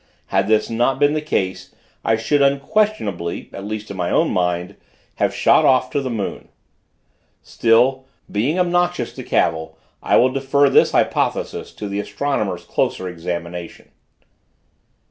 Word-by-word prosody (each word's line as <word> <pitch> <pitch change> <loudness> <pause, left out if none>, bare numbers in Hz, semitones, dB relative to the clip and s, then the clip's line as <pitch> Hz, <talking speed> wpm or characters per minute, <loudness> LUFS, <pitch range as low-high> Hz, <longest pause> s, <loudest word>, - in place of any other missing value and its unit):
Had 95 0 +2
this 110 0 +2
not 120 +3 +1
been 145 0 +4
the 155 - -1
case, 95 -11 -3 0.3
I 115 - +2
should, 115 +6 +1
unquestionably, 140 - 0
at 100 - -7
least 105 0 -5
in 100 - -7
my 90 -1 -1
own - - +2
mind, 90 0 -1 0.4
have - - +1
shot - - +4
off 130 -1 +3
to 145 - 0
the 130 - -3
moon. 110 -5 -4 1.0
Still, 125 +3 +2 0.3
being 125 - 0
obnoxious 175 -6 0
to - - -8
cavil, 80 0 0 0.2
I - - +2
will 130 - +5
defer 135 +1 +2
this - - +4
hypothesis - - 0
to 105 - -6
the 100 0 -3
astronomer's 105 -7 -2
closer 95 - -1
examination. 85 0 -6
115 Hz, 145 wpm, -20 LUFS, 95-140 Hz, 1.0 s, will